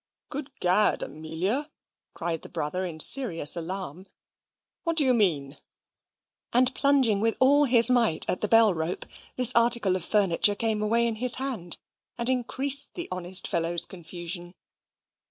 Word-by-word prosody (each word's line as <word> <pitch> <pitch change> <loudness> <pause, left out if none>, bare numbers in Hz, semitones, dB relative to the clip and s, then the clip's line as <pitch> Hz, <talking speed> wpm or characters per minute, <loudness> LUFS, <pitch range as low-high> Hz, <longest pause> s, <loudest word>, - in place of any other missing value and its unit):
"Good 280 0 -7
Gad! 185 +4 +2
Amelia," 180 - -4 0.5
cried 165 -1 -4
the - - -11
brother, 180 +6 -4
in 160 -2 -9
serious 180 - +4
alarm, 180 0 -7 0.8
"what 335 -2 -3
do 295 - +5
you 255 - +3
mean?" 155 - -1 0.9
and 255 +2 +3
plunging 260 -8 +1
with 225 0 0
all 285 +3 +4
his 240 -2 +4
might 230 -10 0
at 180 - -2
the 210 - 0
bell 225 -2 +4
rope, 160 +1 -4 0.3
that 250 -1 +4
article 235 -5 +3
of 185 - -3
furniture 205 0 +1
came 220 0 -2
away 230 +2 +1
in 230 -2 -3
his 250 +1 +4
hand, 245 -11 -5 0.4
and 235 +1 -1
increased 265 +3 +2
the 350 - -7
honest 185 0 -3
fellow's 170 0 +1
confusion. 175 0 -7
210 Hz, 150 wpm, -25 LUFS, 175-250 Hz, 0.9 s, do